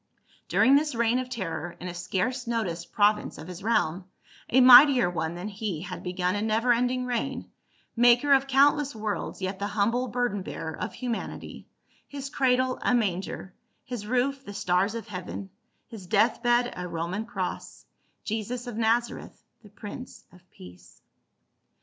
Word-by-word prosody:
During 265 - +4
this 295 -2 +1
reign 235 +1 +2
of 255 0 -5
terror, 180 -7 -4
in 180 - -6
a 175 - -5
scarce 195 +8 -2
noticed 215 -8 -3
province 210 0 +2
of 155 - -9
his 180 0 -8
realm, 190 -5 0 0.4
a 260 - +4
mightier 255 -1 +8
One 165 -1 -3
than 175 +4 -5
he 200 -5 -4
had 180 0 -7
begun 180 0 -1
a 205 - -2
never 225 +3 +2
ending 250 +1 0
reign, 250 +2 -3 0.4
Maker 245 +4 +5
of 270 0 +3
countless 280 0 +3
worlds 210 -2 -4
yet 190 +1 -3
the 200 - -2
humble 225 +5 0
Burden 240 -4 -1
bearer 160 -3 -6
of 210 - -5
humanity, 245 -3 -6 0.4
his 280 -1 -7
cradle 255 -2 +1
a 250 - +2
manger, 190 -3 -2 0.3
his 235 -5 -6
roof 265 +3 0
the 205 -5 -9
stars 190 +3 +1
of 230 0 -6
heaven, 190 0 -7 0.3
his 205 -6 -11
death 220 +4 +2
bed 240 0 +2
a 180 0 -5
Roman 170 +5 -3
cross, 240 - -5 0.4
Jesus 225 +3 -4
of 240 -3 -6
Naza 230 +1 +1
reth, - - -13 0.2
the 210 - -16
Prince 210 +5 -10
of 180 - -17
Peace. 90 0 -15
225 Hz, 160 wpm, -27 LUFS, 185-250 Hz, 0.4 s, mightier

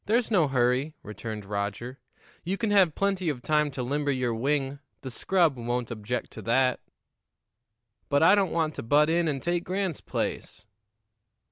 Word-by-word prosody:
"There's 230 +2 +1
no 175 -8 +4
hurry," 130 +3 +1
returned 105 0 -7
Roger. 105 +6 -4 0.4
"You 185 +3 -2
can 220 -1 -1
have 190 -6 +4
plenty 195 -3 0
of 125 -5 -4
time 150 -1 +2
to 130 -2 -5
limber 145 +3 -1
your 125 -3 0
wing; 135 +3 -1 0.2
the 130 - -6
scrub 165 +1 +1
won't 120 0 -3
object 115 +2 -4
to - - -8
that." 125 +2 +2 1.3
"But 145 +1 +3
I 175 +4 +7
don't 200 -3 +3
want 160 -2 0
to - - -3
butt 150 +7 +3
in 170 0 +2
and 140 -3 -2
take 175 0 0
Grant's 185 -3 -2
place." - - -4
145 Hz, 165 wpm, -27 LUFS, 120-170 Hz, 1.3 s, I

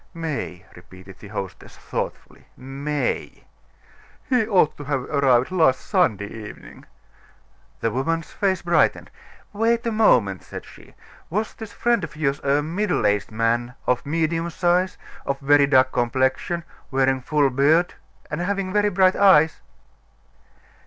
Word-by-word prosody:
"May!" 150 - -5
repeated 95 +2 -14
the 105 - -11
hostess, 95 -2 -7
thoughtfully. - - -6
"May!" 140 +3 -3 0.8
"He 250 -6 +2
ought 185 -8 +3
to 145 - -8
have 135 -1 -1
arrived 135 -1 +2
last 160 -8 +3
Sunday 160 - +1
evening." 105 +1 -11 1.0
The 115 - 0
woman's 165 +7 -2
face 190 -3 -1
brightened. 170 0 +1 0.4
"Wait 230 +3 +1
a 230 - 0
moment," 115 - +3
said - - -9
she. - - -16 0.3
"Was 215 +5 -2
this 220 -2 -9
friend 235 -4 +1
of 155 -1 -7
yours 140 -2 -1
a 140 +1 +1
middle 180 - -1
aged 105 -1 +1
man, 120 +2 -1
of 125 -1 +1
medium 165 +2 -1
size, 180 +2 +1 0.3
of 140 0 -3
very 145 0 +4
dark 130 -1 +4
complexion 130 +7 0 0.3
wearing 135 -1 +1
a - - -15
full 145 +1 +1
beard, 155 +7 +3 0.4
and 155 +3 -2
having 195 0 -2
very 210 0 +3
bright 190 -1 +3
eyes?" 160 -6 +4
150 Hz, 140 wpm, -23 LUFS, 130-180 Hz, 1.0 s, very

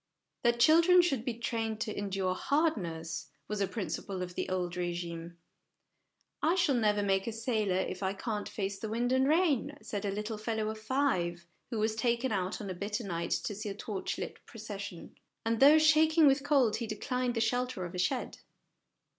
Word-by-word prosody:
That 235 -1 +2
children 335 +7 +6
should 275 -9 0
be 245 -2 -2
trained 225 -2 -2
to 215 -2 -2
endure 195 -2 -1
hardness, 185 - -1 0.2
was 210 -1 -3
a 195 - +2
principle 185 -1 -4
of 180 0 -7
the - - -3
old 180 -1 -2
regime. 170 -1 -4 0.5
" - - -48
I - - +2
shall 345 -6 +3
never 210 -4 +2
make 195 0 +1
a 230 - -2
Bailor 215 -7 +1
if 185 0 -4
I 190 0 0
can't 210 +1 -4
face 195 -1 -3
the 220 - -4
wind 240 +3 0
and 260 +1 +3
rain," 295 -3 +2
said 205 -1 -4
a 205 - -1
little 210 +2 -3
fellow 220 0 -1
of 220 0 -5
five 215 -9 0 0.2
who 235 - -3
was 215 +1 +1
taken 235 +3 0
out 190 -1 -1
on 200 -3 -5
a - - -2
bitter 205 +5 -3
night 170 -4 -3
to - - -1
see 210 +1 -5
a 195 - -5
torchlight 205 -2 -5
procession; 205 -5 -8 0.3
and, 225 0 +1
though 290 +3 +8
shaking 315 +1 +5
with 275 0 +4
cold, 275 -7 +3
he 230 - -4
declined 250 +3 -2
the - - 0
shelter 245 -3 0
of 175 - -7
a 180 - -4
shed. 245 +8 -1
215 Hz, 190 wpm, -31 LUFS, 195-250 Hz, 0.5 s, though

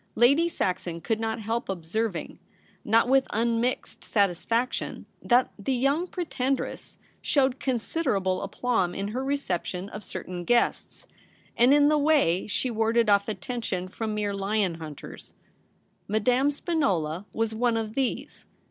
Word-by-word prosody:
Lady 280 +9 +4
Saxon 180 - -2
could 220 +5 -1
not 225 0 -2
help 225 +2 -3
observing, 190 +2 -3 0.4
not 225 +3 +3
with 265 +1 +4
unmixed 235 +2 -1
satisfaction, 220 +5 0 0.2
that 245 +1 +3
the 255 +6 -1
young 280 +8 +1
Pretendress 275 -8 -3 0.2
showed 265 -2 +2
considerable 215 - 0
aplomb 200 -3 -1
in 200 +1 -3
her 250 +5 -3
reception 195 -9 -2
of 210 0 -8
certain 180 -1 -6
guests, 240 +6 0 0.5
and 245 +3 +5
In 290 0 +6
the 300 0 +3
w^ay 285 - +2
she 250 +4 0
warded 225 0 +2
off 200 0 +3
attention 215 -5 -3
from 215 +3 -4
mere 205 -1 -1
lion 200 -1 0
hunters. 155 -3 -10 0.7
Madame 245 +6 +2
Spinola 205 - -1
was 225 -1 -1
one 235 +1 +1
of 220 -1 -3
these. 265 0 -3
225 Hz, 130 wpm, -27 LUFS, 200-260 Hz, 0.7 s, In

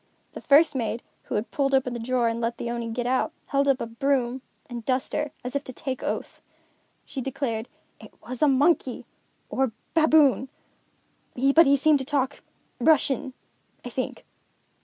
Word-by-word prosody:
The - - -8
first 295 +1 +5
maid, 230 -2 -2 0.2
who - - -4
had 210 +2 -2
pulled 275 -1 +1
open 260 -2 +1
the 240 - -4
drawer 245 0 +1
and 230 0 -1
let 235 0 -1
the 235 - -4
Oni 235 -1 -3
get 240 +1 -3
out, 260 +5 +1 0.2
held 280 0 +2
up 275 -2 +4 0.2
broom 265 -2 +1 0.3
and 240 -2 -7
duster, 265 +4 -1
as 250 +2 -5
if 280 - 0
to 255 - -8
take 260 -1 -4
oath. - - -4 0.6
She 270 - -5
declared: 250 -4 -3 0.3
"It - - -13 0.2
was 255 -1 -6
a 300 - +5
monkey, 275 -1 +2 0.5
or 265 -4 0 0.2
baboon; 305 -5 +4 0.9
but 275 +5 +5
he 280 - +6
seemed 295 +1 +4
to 265 - -4
talk 280 -1 -1 0.4
Russian, 270 -1 +2 0.5
I - - -4
think." - - -4
265 Hz, 165 wpm, -25 LUFS, 245-280 Hz, 0.9 s, he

